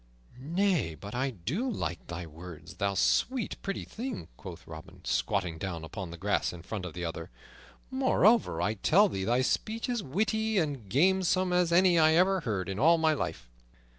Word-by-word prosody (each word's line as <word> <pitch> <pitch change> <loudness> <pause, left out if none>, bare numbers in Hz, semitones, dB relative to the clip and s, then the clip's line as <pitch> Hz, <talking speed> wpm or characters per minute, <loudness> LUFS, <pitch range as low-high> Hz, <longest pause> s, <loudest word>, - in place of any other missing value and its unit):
"Nay, 170 - 0
but 100 +5 -9
I 130 +3 0
do 130 - -3
like 85 - -4
thy 85 0 -5
words, 85 +3 -11
thou 100 0 0
sweet, 250 - +1
pretty 195 0 -4
thing," 240 -1 -6
quoth - - -10
Robin, 80 -1 -11
squatting 90 -6 -1
down 85 -3 -4
upon 90 +2 -6
the 85 - -8
grass 100 +4 0
in 85 -2 -10
front 95 0 -5
of 85 - -7
the 90 0 -4
other. 85 0 -5 0.6
"Moreover, 235 - +3
I 105 - +1
tell 175 - +4
thee 95 - -3
thy 120 +4 +2
speech 225 - -1
is 240 -3 -1
witty 220 +8 0
and 140 - -1
gamesome 185 - +2
as 180 -1 +2
any 175 0 +5
I 155 0 +5
ever 190 +2 +4
heard 105 - -2
in 95 +1 -4
all 165 +5 +5
my 160 -1 +3
life." 145 - -4
135 Hz, 180 wpm, -29 LUFS, -, 0.6 s, any